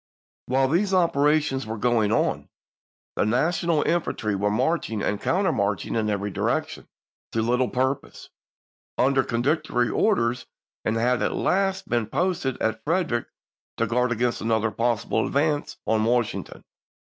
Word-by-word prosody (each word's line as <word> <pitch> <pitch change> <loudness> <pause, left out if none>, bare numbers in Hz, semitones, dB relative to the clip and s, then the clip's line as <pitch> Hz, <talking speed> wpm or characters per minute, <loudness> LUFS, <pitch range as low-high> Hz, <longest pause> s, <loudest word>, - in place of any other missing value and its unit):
While 135 +1 +2
these 190 +7 +1
operations 150 -6 +2
were 110 +1 -4
going 110 -2 +2
on, 115 - 0 0.7
the - - +1
Na 125 +9 +2
tional 170 -3 0
infantry 155 -10 0
were 100 +1 0
marching 115 -1 0
and 105 - -1
countermarch 105 - 0
ing - - -4
in 110 -2 0
every 105 0 -2
direction, - - -2 0.5
to 115 - +1
little 125 +2 +1
purpose, 130 +2 -3 0.7
under 130 0 +3
contradictory 125 0 0
orders, 125 - +1 0.4
and 110 - 0
had 125 +2 +1
at - - 0
last 195 0 0
been 120 -3 0
posted 170 -1 -1
at 110 0 -1
Frederick 155 -8 0 0.5
to 115 - +1
guard 125 +2 +1
against 120 +1 0
another 110 -1 +1
possible 115 0 0
advance 145 +1 0
on 110 -1 +2
Washington. 120 0 -1
125 Hz, 140 wpm, -24 LUFS, 110-150 Hz, 0.7 s, under